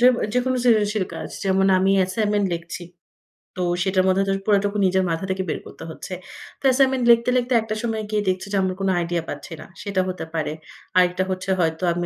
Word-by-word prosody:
যেব 250 Hz, +1 st, +6 dB, 0.2 s
যেকোনো 255 Hz, +1 st, +1 dB
সৃজনশীল 210 Hz, -4 st, +3 dB
কাজ। -, -, -6 dB, 0.2 s
যেমন 195 Hz, 0 st, +3 dB
আমি 190 Hz, +1 st, +3 dB
অ্যাসাইনমেন্ট 205 Hz, +2 st, +1 dB
লেখছি। 170 Hz, +1 st, -6 dB, 0.7 s
তো 180 Hz, -, -1 dB, 0.2 s
সেটার 185 Hz, -1 st, +2 dB
মধ্যে 190 Hz, +1 st, +3 dB
তো -, -, +1 dB
পুরাটুকু 205 Hz, 0 st, +2 dB
নিজের 190 Hz, 0 st, +2 dB
মাথা 165 Hz, +3 st, -2 dB
থেকে 190 Hz, 0 st, -1 dB
বের -, -, -2 dB
করতে -, -, -11 dB
হচ্ছে। 185 Hz, +3 st, -8 dB, 0.5 s
তো -, -, -27 dB
অ্যাসাইনমেন্ট 260 Hz, -1 st, +3 dB
লিখতে, 235 Hz, +1 st, +4 dB
লিখতে 250 Hz, +1 st, 0 dB
একটা 220 Hz, -1 st, -4 dB
সময় 220 Hz, -2 st, -2 dB
গিয়ে 210 Hz, -1 st, 0 dB
দেখছি 185 Hz, +1 st, -2 dB
যে, 200 Hz, -, +1 dB
আমরা 185 Hz, -1 st, 0 dB
কোন 195 Hz, -, 0 dB
আইডিয়া 170 Hz, -1 st, -1 dB
পাচ্ছি 145 Hz, +4 st, -7 dB
না -, -, -10 dB, 0.2 s
সেটা 195 Hz, -2 st, 0 dB
হতে 185 Hz, -2 st, -4 dB
পারে। 155 Hz, -2 st, -1 dB, 0.4 s
আরেকটা 180 Hz, 0 st, +3 dB
হচ্ছে, 185 Hz, 0 st, -3 dB
হয়তো 160 Hz, +1 st, 0 dB
আমি 175 Hz, 0 st, -2 dB
190 Hz, 200 wpm, -23 LUFS, 185-215 Hz, 0.7 s, যেব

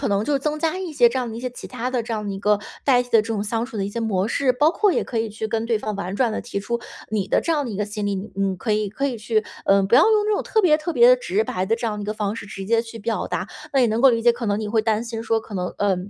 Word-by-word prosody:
可 275 Hz, -, -1 dB
能 200 Hz, +1 st, +1 dB
就 290 Hz, -2 st, +1 dB
增 300 Hz, +2 st, -2 dB
加 325 Hz, +3 st, 0 dB
一 365 Hz, -4 st, -5 dB
些 245 Hz, -5 st, +5 dB
这 260 Hz, +2 st, -2 dB
样 245 Hz, -, -2 dB
的 225 Hz, -, -7 dB
一 -, -, -6 dB
些 255 Hz, 0 st, -3 dB
其 245 Hz, -, -9 dB
它 250 Hz, 0 st, -4 dB
的 250 Hz, -2 st, 0 dB
这 230 Hz, -, -3 dB
样 210 Hz, -1 st, -4 dB
的 -, -, -2 dB
一 195 Hz, -, -5 dB
个 205 Hz, +1 st, +2 dB, 0.2 s
代 250 Hz, -3 st, +4 dB
替 245 Hz, -, -15 dB
的 225 Hz, -, +6 dB
这 215 Hz, -, -7 dB
种 205 Hz, -, -1 dB
相 225 Hz, +2 st, -2 dB
处 245 Hz, -, -9 dB
的 195 Hz, -, -1 dB
一 -, -, -3 dB
些 235 Hz, -, -5 dB
模 205 Hz, -3 st, 0 dB
式， 260 Hz, +2 st, +2 dB
包 295 Hz, +5 st, +3 dB
括 400 Hz, +2 st, +2 dB
也 -, -, +1 dB
可 230 Hz, -, -3 dB
以 225 Hz, -, -1 dB
去 220 Hz, +1 st, -5 dB
跟 225 Hz, 0 st, -1 dB
对 230 Hz, -1 st, +2 dB
方 215 Hz, 0 st, -3 dB
婉 190 Hz, -1 st, -4 dB
转 235 Hz, +1 st, +2 dB
地 -, -, -3 dB
提 215 Hz, -4 st, -4 dB
出 235 Hz, +4 st, -2 dB, 0.3 s
你 210 Hz, -3 st, -1 dB
的 -, -, +2 dB
这 335 Hz, -, 0 dB
样 295 Hz, -3 st, 0 dB
的 245 Hz, -, -4 dB
一 -, -, -5 dB
个 210 Hz, -, 0 dB
心 210 Hz, 0 st, -4 dB
理， 200 Hz, -, 0 dB, 0.2 s
你 195 Hz, -1 st, 0 dB
可 220 Hz, -, -4 dB
以 210 Hz, 0 st, 0 dB
可 275 Hz, +8 st, -2 dB
以 240 Hz, -4 st, -4 dB
去， 215 Hz, 0 st, 0 dB, 0.2 s
呃 195 Hz, 0 st, +5 dB
不 195 Hz, +4 st, +2 dB
要 280 Hz, -, +7 dB
用 430 Hz, 0 st, +4 dB
这 425 Hz, -, +1 dB
种 410 Hz, -, +1 dB
特 440 Hz, -2 st, +1 dB
别 310 Hz, -4 st, +5 dB
特 330 Hz, +2 st, -3 dB
别 -, -, +7 dB
直 -, -, 0 dB
白 185 Hz, -, -2 dB
的 225 Hz, -, +2 dB
这 235 Hz, -, -6 dB
样 210 Hz, -, -2 dB
的 -, -, -4 dB
一 -, -, -4 dB
个 210 Hz, -, -2 dB
方 210 Hz, 0 st, -2 dB
式 200 Hz, -, -7 dB
直 195 Hz, -1 st, -7 dB
接 230 Hz, +3 st, +2 dB
去 230 Hz, 0 st, -9 dB
表 225 Hz, +2 st, -2 dB
达。 190 Hz, -, -3 dB, 0.2 s
那 270 Hz, -, +3 dB
也 245 Hz, -, +5 dB
能 220 Hz, +1 st, 0 dB
够 270 Hz, -, +7 dB
理 230 Hz, -1 st, 0 dB
解， 240 Hz, 0 st, +5 dB
可 235 Hz, 0 st, -5 dB
能 205 Hz, +1 st, 0 dB
你 215 Hz, -, -3 dB
会 220 Hz, 0 st, +2 dB
担 220 Hz, 0 st, +1 dB
心 230 Hz, -1 st, -5 dB
说， 225 Hz, 0 st, +1 dB
可 220 Hz, -, -14 dB
能， 180 Hz, -, -1 dB
呃， 200 Hz, -2 st, +2 dB
225 Hz, 380 characters per minute, -22 LUFS, 210-255 Hz, 0.3 s, 要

